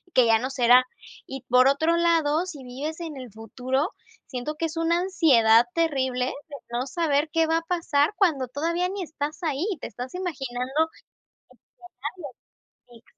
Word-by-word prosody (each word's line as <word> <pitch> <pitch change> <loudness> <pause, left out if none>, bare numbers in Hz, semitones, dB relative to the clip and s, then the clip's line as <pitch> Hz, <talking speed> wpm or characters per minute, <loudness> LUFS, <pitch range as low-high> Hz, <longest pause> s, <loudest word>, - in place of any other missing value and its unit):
que 250 -2 +6
ya 225 -1 +4
no 260 +2 -3
será, 250 -1 +5 0.4
y 270 -1 -7
por 250 +2 +6
otro 315 +5 +2
lado, 330 -1 +2
si 290 -7 -8
vives 285 +6 -6
en 320 -3 -6
el 250 -4 -9
futuro, 255 - -2 0.4
siento 260 +4 -5
que 330 - -2
es 325 +1 -5
una 335 +1 +2
ansiedad 245 - +5
terrible 260 -6 0
de 285 +2 -7 0.2
no 245 +3 -2
saber 310 -2 0
qué 325 0 +3
va 325 0 +2
a - - -1
pasar 330 -4 +1
cuando 300 -10 +2
todavía 335 +7 -1
ni 390 -1 -4
estás 310 -1 -5
ahí, 310 +2 -1
te - - -7
estás 250 - -8
imaginando 280 -3 -2 2.0
escenarios, 235 -1 -17
290 Hz, 160 wpm, -25 LUFS, 255-330 Hz, 2.0 s, que